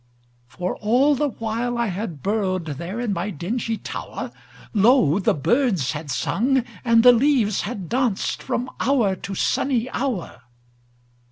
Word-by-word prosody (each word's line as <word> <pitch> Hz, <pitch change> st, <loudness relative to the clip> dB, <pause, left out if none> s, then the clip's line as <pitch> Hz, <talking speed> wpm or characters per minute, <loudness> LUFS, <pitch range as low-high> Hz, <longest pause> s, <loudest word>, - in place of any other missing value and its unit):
For 180 Hz, +8 st, -4 dB
all 250 Hz, +7 st, +3 dB
the 290 Hz, +1 st, 0 dB
while 230 Hz, +1 st, -3 dB
I 235 Hz, -, +1 dB
had 185 Hz, -, -5 dB
burrowedThere 185 Hz, -, -2 dB
in 220 Hz, -4 st, -1 dB
my 180 Hz, +3 st, -2 dB
dingy 220 Hz, -, -3 dB
tower, -, -, -6 dB, 0.4 s
Lo! 205 Hz, -, +4 dB
the 190 Hz, -, +2 dB
birds 190 Hz, -, +1 dB
had 150 Hz, -1 st, -6 dB
sung 245 Hz, -, +1 dB, 0.2 s
and 230 Hz, -2 st, +4 dB
the 250 Hz, -, +10 dB
leaves 240 Hz, -5 st, +2 dB
had 200 Hz, -5 st, -5 dB
dancedFrom 245 Hz, +1 st, -1 dB
hour 240 Hz, -8 st, +2 dB
to 195 Hz, +2 st, -6 dB
sunny 255 Hz, +4 st, 0 dB
hour. 240 Hz, -, -3 dB
220 Hz, 135 wpm, -23 LUFS, 185-245 Hz, 0.4 s, the